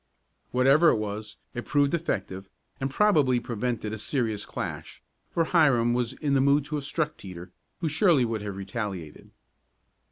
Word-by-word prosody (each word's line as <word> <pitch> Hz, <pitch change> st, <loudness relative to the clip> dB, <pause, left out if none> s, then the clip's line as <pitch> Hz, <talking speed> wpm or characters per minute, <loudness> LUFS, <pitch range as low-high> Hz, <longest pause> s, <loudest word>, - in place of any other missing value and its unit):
Whatever 135 Hz, +6 st, +5 dB
it -, -, +3 dB
was, 105 Hz, 0 st, -4 dB, 0.2 s
it 120 Hz, -, -4 dB
proved 145 Hz, 0 st, +2 dB
effective 95 Hz, -, -3 dB, 0.3 s
and 135 Hz, -, -1 dB
probably 145 Hz, -8 st, +3 dB
prevented 115 Hz, -2 st, -3 dB
a 110 Hz, -, -5 dB
serious 110 Hz, -3 st, -2 dB
clash, -, -, -6 dB, 0.3 s
for 165 Hz, -, +1 dB
Hiram 135 Hz, -9 st, +3 dB
was 120 Hz, 0 st, -1 dB
in 145 Hz, 0 st, -2 dB
the 135 Hz, -, +4 dB
mood 140 Hz, +1 st, +3 dB
to 150 Hz, +1 st, -4 dB
have 140 Hz, -, -5 dB
struck 150 Hz, +1 st, -2 dB
Teeter, 90 Hz, -2 st, -9 dB, 0.3 s
who 165 Hz, -, 0 dB
surely 155 Hz, -3 st, +3 dB
would 115 Hz, -2 st, -2 dB
have 100 Hz, -2 st, -5 dB
retaliated. 100 Hz, -7 st, -6 dB
125 Hz, 160 wpm, -27 LUFS, 105-145 Hz, 0.3 s, Whatever